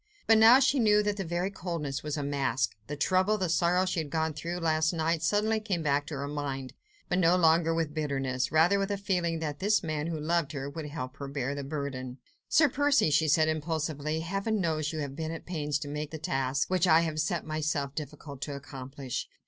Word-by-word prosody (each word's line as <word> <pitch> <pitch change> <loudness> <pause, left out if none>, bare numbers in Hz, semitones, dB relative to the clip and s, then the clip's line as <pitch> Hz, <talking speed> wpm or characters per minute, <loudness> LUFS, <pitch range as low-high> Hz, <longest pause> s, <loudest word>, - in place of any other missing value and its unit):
But 225 -1 +5
now 230 +4 +8
she 275 0 +3
knew 210 -2 +4
that 210 0 -1
that 195 -4 -3
very 175 +3 -1
coldness 165 -7 -4
was 150 0 -3
a 145 - -2
mask. 135 -5 0
The 145 - -4
trouble, 185 +7 +2
the 185 -3 -1
sorrow 175 +3 +2
she 185 -2 -1
had 155 -2 -3
gone 160 +1 -1
through 170 +4 -4
last 160 -1 +1
night, 165 0 0
suddenly 210 +6 +1
came 195 -6 -2
back 145 -1 +1
to 150 - -5
her 140 0 -4
mind, 140 -3 -4 0.3
but 180 - 0
no 175 0 +5
longer 165 -1 +4
with 165 -2 -1
bitterness, 135 -4 -1
rather 165 +6 +4
with 195 0 -1
a 200 - -1
feeling 180 -4 -1
that 150 -2 -3
this 210 +2 +2
man 155 -1 -2
who 165 -2 -3
loved 160 -1 0
her, 140 -1 -4
would 150 +2 -6
help 130 -4 -6
her 140 - -6
to 140 - -9
bear 140 -1 -2
the 140 0 -5
burden. 135 -3 -5 0.3
"Sir 310 +1 +5
Percy," 285 - +2
she 155 +2 +3
said 155 +1 +4
impulsively, 155 -1 -2
"Heaven 195 +5 -1
knows 155 -4 0
you 160 - -5
have 140 -2 -5
been 160 +1 -4
at 165 0 -6
pains 150 -5 -2
to 150 - -6
make 150 +1 -4
the 160 - -6
task, 135 -2 -1
which 185 -1 +2
I 160 -1 +6
had 160 -2 -2
set 175 +1 0
to - - -18
myself, 155 -2 -1
terribly 150 - -3
difficult 140 -1 -11
to 145 -1 -4
accomplish. 135 -2 -6
155 Hz, 230 wpm, -29 LUFS, 145-175 Hz, 0.3 s, now